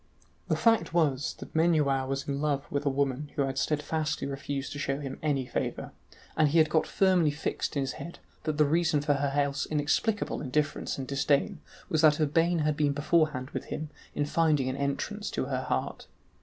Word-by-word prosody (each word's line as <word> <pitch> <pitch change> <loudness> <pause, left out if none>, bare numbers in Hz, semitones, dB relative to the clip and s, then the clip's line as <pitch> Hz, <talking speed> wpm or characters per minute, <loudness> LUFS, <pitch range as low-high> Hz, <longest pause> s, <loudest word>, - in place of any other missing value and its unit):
The - - +2
fact 225 -7 +2
was, 145 -5 +1
that - - -10
Menuau 150 -5 +2
was 135 +1 -3
in 140 0 -2
love 145 -2 0
with 145 0 -1
a - - +5
woman 140 +1 -1
who 140 - +2
had 135 0 -2
steadfastly 155 +1 -1
refused 140 0 -4
to 145 - -5
show 135 -1 -1
him 135 -2 -6
any 140 -4 0
favour, - - -3 0.4
and 155 -1 +4
he 160 - +2
had 155 -1 +4
got 160 - +2
firmly 185 -5 +3
fixed 150 +2 -3
in - - +2
his 135 - -1
head 170 - -8 0.3
that 155 -2 -1
the 150 - +5
reason 160 0 +2
for 145 0 +2
her 140 0 0
else 140 -1 0
inexplicable 155 +8 0
indifference 150 +2 -1
and 135 -1 -5
disdain 145 +5 +1 0.3
was 155 - +1
that 155 -1 +5
Urbain 165 +3 +2
had 150 -1 +1
been 145 -2 +1
beforehand 150 -3 +1
with - - -4
him 155 -1 -5 0.2
in 145 - +1
finding 150 -3 +2
an 130 - -2
entrance 140 +10 -2
to - - -2
her 130 -1 -2
heart. 65 - -2
145 Hz, 195 wpm, -29 LUFS, 140-155 Hz, 0.4 s, a